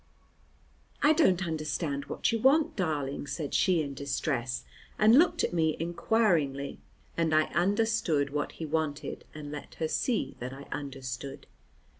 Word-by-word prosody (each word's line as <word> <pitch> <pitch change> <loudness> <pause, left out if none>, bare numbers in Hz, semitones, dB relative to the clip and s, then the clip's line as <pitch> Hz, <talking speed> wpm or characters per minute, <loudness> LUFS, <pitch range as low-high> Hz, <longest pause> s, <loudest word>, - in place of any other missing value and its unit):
"I 300 - +7
don't 190 - +3
understand 155 -3 -2
what - - -1
you 230 - 0
want, 280 +6 +4
darling," 145 -7 -2
said 150 -2 -4
she 175 -4 +3
in 140 -1 -5
distress, 135 -2 -2 0.3
and 220 +5 +7
looked 345 - +3
at - - 0
me 160 -2 +1
inquiringly, 165 -6 +1 0.4
and 165 -2 +1
I 155 0 +2
understood 190 -5 +1
what 145 0 -2
he 160 - -6
wanted, 155 -1 -2
and 150 -1 -7
let 150 - -8
her 160 - -1
see 235 +8 -1
that 125 +2 -5
I 135 +1 -9
understood. 135 -1 -6
155 Hz, 145 wpm, -29 LUFS, 140-185 Hz, 0.4 s, I